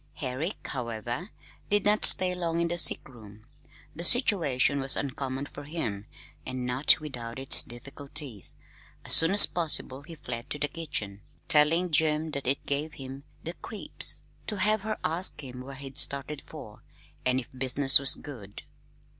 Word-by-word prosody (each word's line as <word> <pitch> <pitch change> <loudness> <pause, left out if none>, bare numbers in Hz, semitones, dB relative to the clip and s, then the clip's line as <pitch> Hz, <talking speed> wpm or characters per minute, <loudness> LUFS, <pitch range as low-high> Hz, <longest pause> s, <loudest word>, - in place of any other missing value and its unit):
Herrick, 140 +7 -5
however, 120 - -5 0.4
did 205 0 0
not 210 +1 +5
stay 185 -1 +5
long 170 -2 -3
in 170 0 -1
the 175 - -2
sick - - -2
room. 110 -4 -16 0.5
The 170 - -7
situation 165 - +2
was 135 0 +2
uncommon 135 0 -4
for 145 0 -11
him, 115 -10 -5 0.4
and 130 -1 -5
not 125 +3 +4
without 125 -6 -8
its 135 0 +4
difficulties. 135 - -4 0.5
As - - +2
soon 165 - +7
as 200 +2 +9
possible 150 -5 -3
he 165 +3 -12
fled 125 -3 -7
to 150 - -3
the 145 - -2
kitchen, 110 -11 -4 0.3
telling 165 +3 +3
Jim 155 0 +1
that 140 -3 -6
it 135 +2 -2
gave 150 +2 -3
him 135 +1 -10 0.2
"the 170 - -6
creeps" 215 +3 -2 0.2
to 210 - -1
have 215 +2 +1
her 215 +1 -4
ask 175 +4 -1
him 125 -1 -9
where 135 +2 -10
he'd 135 0 -3
started 140 +1 +2
for, - - -13 0.4
and 130 0 0
if 125 - -9
business 135 +1 +6
was 135 -1 +6
good. 105 -9 -11
140 Hz, 165 wpm, -27 LUFS, 130-165 Hz, 0.5 s, as